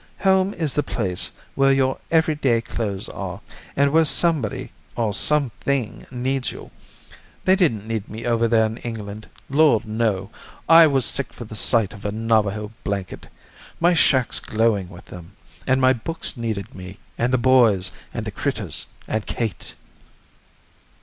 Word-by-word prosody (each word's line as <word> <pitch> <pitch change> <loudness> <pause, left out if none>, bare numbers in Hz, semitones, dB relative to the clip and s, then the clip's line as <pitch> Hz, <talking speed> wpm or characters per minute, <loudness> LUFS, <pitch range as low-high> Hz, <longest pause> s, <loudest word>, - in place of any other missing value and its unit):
Home 190 0 +3
is 155 -5 -1
the 145 - +1
place 95 -10 -2 0.2
where 135 0 +3
your 135 -1 +1
everyday 150 -7 +2
clothes 110 -4 -3
are, 95 -1 -6 0.4
and 140 0 +3
where 160 +2 +5
somebody, 155 -7 +1 0.2
or 110 -3 0
something 135 - 0
needs 130 +1 -2
you. - - -11 0.7
They 190 - +5
didn't 115 - +1
need 110 -2 -3
me 110 +2 -7
over 115 -1 +2
there 110 -1 +3
in 110 +1 -4
England. 110 -3 -7 0.2
Lord 140 -5 +3
no! 110 -2 -1 0.4
I 165 0 +8
was 135 -4 +2
sick 140 - 0
for 120 - -9
the 110 - -9
sight 110 -1 +2
of 100 -2 -12
a 105 - -2
Navajo 105 -1 0
blanket. 100 -2 -4 0.5
My 175 +1 +4
shack's 130 -6 +3
glowing 110 -4 0
with 90 -2 -13
them. 90 -2 -12 0.3
And 130 0 +3
my 130 0 +5
books 165 +8 -3
needed 110 -5 -4
me, 95 +1 -10 0.2
and 120 +4 0
the 130 - +3
boys, 115 -8 +4 0.2
and - - -5
the - - -4
critters, - - -3 0.2
and 110 -1 -2
Kate." 115 -4 -4
115 Hz, 155 wpm, -22 LUFS, 105-135 Hz, 0.7 s, I